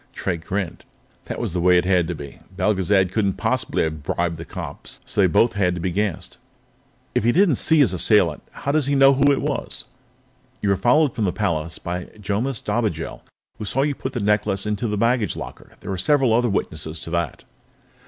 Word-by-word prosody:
Drake 85 -3 -3
grinned. 95 -3 -3 0.4
That - - -5
was - - -3
the 90 - -1
way 90 0 +5
it 90 - +2
had 90 -3 +2
to 90 - -3
be. 70 -2 -10 0.2
Belgezad 95 -1 +2
couldn't 100 -2 +1
possibly - - -1
have 80 -1 -3
bribed 85 +3 -1
the 80 - -7
cop, - - -8
so 105 - -2
they 95 - +5
both 115 +8 +3
had 90 -4 +1
to - - -5
be 90 +2 -1
gassed. 100 -1 -2 0.7
"If - - +1
he 120 - +4
didn't 170 - +3
see 160 - +4
his 135 -11 +4
assailant, 90 -4 +3
how 140 - -3
does 150 -2 +1
he 140 - +1
know 135 0 +7
who 140 +1 +4
it 140 - 0
was?" - - -3 0.7
"You 100 - -1
were 100 - +4
followed 125 - +3
from 110 - -1
the 90 - +1
palace 85 -5 -2
by 90 0 -4
Jomis 105 +5 -2
Dobigel, - - -2 0.4
who 105 - -4
saw 130 +7 +1
you 145 0 0
put 130 0 -5
the 120 - -2
necklace 105 -1 +1
into 105 +2 -1
the 105 -1 -2
baggage 115 0 +1
locker. - - -9
There - - -5
are 95 - -2
several 135 -1 +3
other 120 +1 +3
witnesses 80 -5 -2
to 80 - -7
that." 85 -4 -2
100 Hz, 210 wpm, -22 LUFS, 90-120 Hz, 0.7 s, know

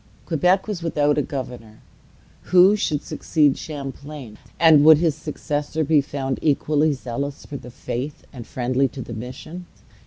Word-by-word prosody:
Quebec 180 +5 +2
was 205 -5 -4
without 150 -3 +1
a 150 - +2
governor. 125 -6 -7 0.7
Who 185 +3 +6
should 155 -8 -1
succeed 150 -4 +1
Champlain? 140 -4 -8 0.2
and 160 -3 +7
would 155 0 +8
his 160 -1 +1
successor 150 +1 -3
be 150 0 +3
found 135 -1 -4
equally 150 0 +2
zealous 140 +2 -5
for 145 - -6
the 125 - -11
Faith, 125 +4 -6
and 120 -4 -9
friendly 130 +2 0
to 130 +1 -8
the 120 - -8
mission? 130 +10 -8
145 Hz, 150 wpm, -22 LUFS, 130-155 Hz, 0.7 s, would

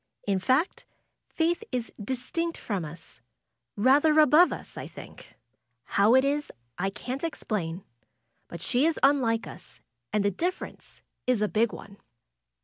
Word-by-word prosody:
In 195 -2 +1
fact. 260 - 0 0.4
Faith 340 +5 0
is 240 -2 -3
distinct 265 +9 -2
from 200 -6 -3
us; 150 -6 -12 0.5
rather 290 +8 +4
above 310 +4 +6
us, - - -7
I - - -6
think. - - -13 0.5
How 205 - +3
it 260 +1 +5
is 290 +1 -1 0.3
I 195 +2 +1
can't 255 +8 -6
explain. 195 - -3 0.6
But 170 0 -8
she 255 +8 +2
is 330 - 0
unlike 250 -5 +3
us, - - -12 0.3
and 205 -1 +1
the 200 - +3
differ 350 - -2
ence - - -16 0.2
is 245 -4 +2
a - - +2
big 220 +2 +1
one." 200 0 -11
250 Hz, 145 wpm, -27 LUFS, 200-295 Hz, 0.6 s, above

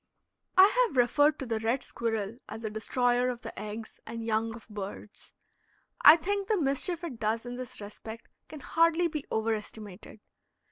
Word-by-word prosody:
I 375 - +10 0.2
have 275 - -8
referred 290 +5 +4
to 270 - -5
the 225 -2 -1
red 230 +4 0
squirrel 225 -1 -3
as 225 +1 -7
a 215 - -3
destroyer 245 +3 +1
of 245 -1 -5
the - - -7
eggs 215 +1 -7
and 230 0 -5
young 225 0 0
of 235 - -13
birds. 205 0 -8 0.7
I 310 - +10
think 395 +4 -2
the 430 -4 +2
mischief 320 +4 +1
it 275 -9 -6
does 225 +2 -1
in 245 0 -5
this 250 -1 -7
respect 220 +2 -9 0.2
can 305 -2 -10
hardly 335 +4 +3
be 305 -3 -5
over 220 +1 0
estimated. 210 -1 -8
235 Hz, 175 wpm, -29 LUFS, 220-290 Hz, 0.7 s, I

